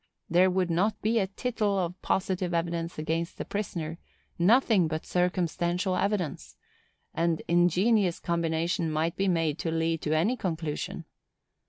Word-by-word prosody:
There 180 +2 +5
would 180 -1 0
not 195 +6 +1
be 225 +2 +2
a 195 - +1
tittle 210 -1 -1
of 180 -1 -2
positive 185 -2 -1
evidence 170 0 -2
against 165 +2 -2
the - - -4
prisoner, 170 -5 -4 0.4
nothing 210 -1 +4
but 155 0 -4
circumstantial 180 +1 0
evidence; 195 -6 -2 0.6
and 165 -1 0
ingenious 180 +3 +3
combination 170 0 0
might 160 +2 0
be 195 +2 0
made 165 -4 +1
to 165 - -2
lead 165 0 0
to 155 +1 +1
any 210 +11 +2
conclusion. 160 -8 -4
175 Hz, 140 wpm, -28 LUFS, 165-190 Hz, 0.6 s, There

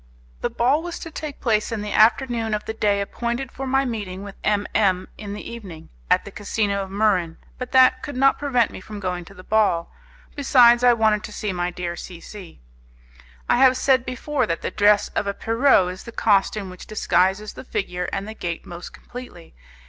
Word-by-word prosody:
The - - 0
ball 265 +6 +2
was 345 0 -5
to 330 - -8
take 305 -2 -6
place 215 -3 +1
in 220 -2 -3
the 210 - -5
afternoon 230 -1 +3
of 210 - -5
the 220 - -3
day 205 -2 +1
appointed 240 +5 -3
for 270 0 -6
my 270 +1 +2
meeting 205 -6 -4
with 200 -1 -8
M 205 -1 +1
M, 185 -3 +2
in 205 -1 -7
the 210 - -7
evening 195 -9 -9 0.2
at - - +3
the - - -8
casino 205 -1 -1
of 195 - -6
Muran, 190 -5 +1 0.2
but 250 -1 -5
that 255 0 +5
could 280 +1 -6
not 270 +1 +3
prevent 250 -6 +1
me - - -9
from 210 +2 -8
going 180 -2 -3
to 195 - -15
the 185 - -12
ball; 205 -5 +1 0.4
besides, 245 -4 +5
I 245 -1 +7
wanted 215 -2 +2
to - - -9
see 210 -1 -3
my 175 0 -1
dear 175 -1 -4
C 175 -1 -9
C. 175 - -11 0.9
I - - +3
have 260 0 +5
said 260 -2 +3
before 265 +4 -2
that 165 - -3
the - - -2
dress 205 0 +3
of 200 - -2
a 200 - -2
Pierrot 225 -6 +3
is 185 - -11
the 235 - -9
costume 200 -3 +1
which 180 - -11
disguises 205 -1 +1
the - - -9
figure 195 -7 -3
and 195 +1 -3
the 220 - -6
gait 170 -5 -5
most 175 0 -9
completely. 245 -9 -11
215 Hz, 210 wpm, -23 LUFS, 190-245 Hz, 0.9 s, I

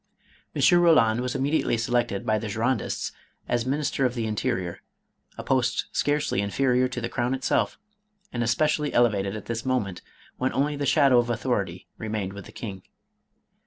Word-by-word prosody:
M. 175 -3 +5
Roland 125 -9 +5
was 125 +1 -3
immediately 135 -2 +1
selected 115 -3 0
by 110 0 +2
the 110 - -5
Girondists 115 +3 -1 0.4
as 120 0 0
Minister 145 0 0
of 125 -1 +1
the 115 -2 -1
Interior, 95 -5 -2 0.6
a - - -5
post 130 -2 +1
scarcely 145 -8 +1
inferior 125 +5 +2
to 125 -1 -5
the 115 - -2
crown 125 +1 -1
itself, 135 - 0 0.6
and 120 - -2
especially 150 +5 +1
elevated 105 -4 +2
at 105 - -7
this 115 -1 -3
moment 105 -9 -1 0.4
when 130 - -1
only 145 +2 +1
the 145 -1 -2
shadow 135 -3 +5
of 120 0 0
authority 100 -6 -2
remained 105 -3 -3
with 100 -2 -9
the - - -12
king. 100 -5 -7
120 Hz, 160 wpm, -26 LUFS, 110-135 Hz, 0.6 s, M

